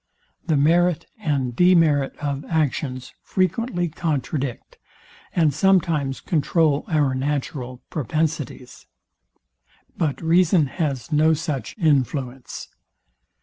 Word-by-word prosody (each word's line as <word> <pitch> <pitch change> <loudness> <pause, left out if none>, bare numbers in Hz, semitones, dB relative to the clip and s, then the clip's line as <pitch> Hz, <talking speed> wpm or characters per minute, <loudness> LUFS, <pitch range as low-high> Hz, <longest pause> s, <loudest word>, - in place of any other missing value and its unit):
The 155 -4 +2
merit 170 +3 +3
and 140 - -1
demerit 165 -6 +3
of 140 -1 -3
actions 135 -5 -2
frequently 185 0 0
contradict, 145 -5 -3 0.6
and 160 -4 +3
sometimes 160 -7 +2
controul 155 -2 +1
our 145 -4 +2
natural 130 -2 -3
propensities. 150 -3 -3 1.1
But 155 -5 -1
reason 170 0 +3
has 140 -1 -3
no 155 +1 +4
such 150 - -4
influence. 135 - -1
150 Hz, 90 wpm, -23 LUFS, 135-165 Hz, 1.1 s, no